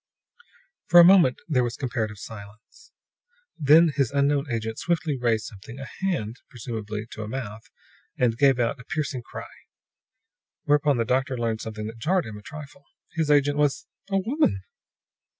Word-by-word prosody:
For 175 - +8
a - - +11
moment 175 -8 +6
there 130 -6 +2
was 120 -1 -3
comparative 115 -5 -3
silence. 105 - -12 0.7
Then 160 +3 +6
his 135 -5 +2
unknown 140 0 +1
agent 110 -1 -3
swiftly 165 -3 0
raised 115 -4 0
something 110 +4 -10
a 135 - -7
hand, 145 - -2
presumably 110 -3 -5
to - - -7
a 105 - -5
mouth, 115 -1 -6 0.5
and 120 -3 +2
gave 135 0 +4
out 120 +3 0
a - - -10
piercing 145 -4 -3
cry. - - -11 1.0
Whereupon 145 -2 +3
the 115 - 0
doctor 130 +2 0
learned 115 -2 -1
something 110 -1 -6
that 115 +1 -8
jarred 180 +8 +1
him 110 - -8
a - - -14
trifle. 140 +2 -11 0.3
His 160 -2 -1
agent 145 0 +3
was 145 -1 +1 0.2
a 195 - +1
woman! 195 - +1
130 Hz, 160 wpm, -25 LUFS, 110-150 Hz, 1.0 s, a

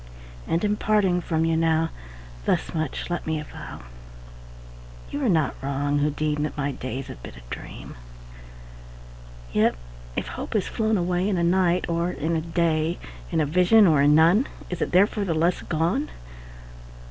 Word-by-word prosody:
And, 165 - 0
in 210 0 +1
parting 195 -5 +2
from 160 -1 0
you 165 0 +2
now, 165 0 +2 0.5
Thus - - 0
much 155 -3 -3
let 175 - -3
me 160 -1 0
avow 150 - -9 1.3
You 285 - -3
are 250 - +3
not 160 -7 +2
wrong, 140 +1 0
who 145 +1 +2
deem 150 0 -1
That 150 0 -3
my 145 0 -1
days 130 0 -5
have - - -10
been - - -10
a - - -9
dream: - - -9 1.6
Yet - - +3 0.4
if - - -3
hope - - -6
has 205 - +2
flown 220 -1 0
away 180 +2 0
In 195 - 0
a 170 - +1
night, 180 0 +2
or 170 +1 0
in 165 -1 -2
a 160 - 0
day, 165 0 0 0.3
In - - +1
a 155 - +3
vision 180 +8 +5
or 155 -6 +4
in 145 +1 +5
none, 170 - +5 0.2
Is 180 - -4
it - - -1
therefore 200 +3 +3
the 170 -5 -1
less 170 +3 +1
gone? 175 - 0
165 Hz, 170 wpm, -25 LUFS, 150-180 Hz, 1.6 s, vision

